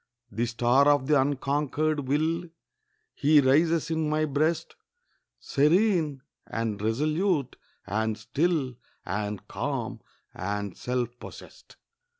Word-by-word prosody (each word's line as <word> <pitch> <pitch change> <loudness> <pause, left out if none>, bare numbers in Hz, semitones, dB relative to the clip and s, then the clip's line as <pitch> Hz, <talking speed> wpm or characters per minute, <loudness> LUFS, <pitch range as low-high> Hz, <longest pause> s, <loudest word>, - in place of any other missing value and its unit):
The 115 +4 -1
star 120 +4 +3
of 145 -2 +4
the 145 -1 +4
unconquered 145 +1 -1
will, 160 +5 0 0.7
He 150 +1 +4
rises 160 +5 +3
in 160 -1 0
my 155 0 +1
breast, 155 +3 0 0.6
Serene, 155 -2 +2 0.2
and 110 -3 -3
resolute, 150 - 0 0.3
and 110 +2 -1
still, 140 +1 -1 0.3
And 105 +1 -4
calm, 125 -4 -3 0.3
and 100 0 -4
self 125 -1 -2
possessed. - - -12
140 Hz, 105 wpm, -27 LUFS, 120-155 Hz, 0.7 s, of